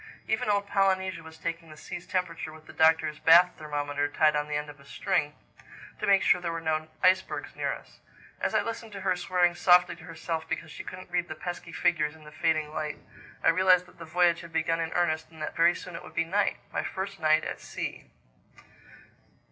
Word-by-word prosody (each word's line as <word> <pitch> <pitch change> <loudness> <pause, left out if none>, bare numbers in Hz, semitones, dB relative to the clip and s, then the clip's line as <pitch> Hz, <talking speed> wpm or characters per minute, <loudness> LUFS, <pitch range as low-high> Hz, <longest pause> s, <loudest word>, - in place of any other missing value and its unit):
Even 220 -1 0
old 200 -1 +2
Polynesia 190 -3 +1
was 160 0 -12
taking 165 0 -5
the 155 - -12
sea's 170 - -8
temperature 180 -4 -2
with 155 0 -14
the - - -12
Doctor's 160 -1 +3
bath 175 +2 +7
thermometer 145 -1 -2
tied 155 +1 +3
on 150 0 0
the 150 - -3
end 150 0 -2
of 145 -1 -12
a - - -16
string, 145 +1 -1 0.6
to - - -2
make 195 -1 +5
sure 180 - +4
there 170 -1 -2
were 165 - -3
no 155 -1 -1 0.2
icebergs 185 +1 +2
near - - -1
us. - - -10 0.4
As - - -1
I - - +3
listened 225 -1 -6
to 200 - -7
her 185 -1 +1
swearing 180 0 +2
softly 175 +1 +5
to 160 - -13
herself 165 0 -4
because 160 - -4
she - - -8
couldn't 185 -1 -9
read 175 -1 0
the - - -6
pesky 175 -1 -6
figures 160 -3 +1
in 160 - -16
the 150 - -12
fading 155 -1 0
light, 150 -1 -3 0.5
I - - +6
realized 185 +1 +5
that - - -20
the 165 - -7
voyage 170 +1 +2
had 170 -1 -11
begun 165 0 0
in 165 -1 -2
earnest 160 -3 0
and 160 -1 -15
that - - -4
very 170 +1 +4
soon 180 -2 -8
it - - -6
would - - -13
be - - +1
night—my 200 +4 -1
first 195 0 -5
night 155 -1 +4
at - - -4
sea! - - -6
165 Hz, 215 wpm, -28 LUFS, 155-180 Hz, 0.6 s, bath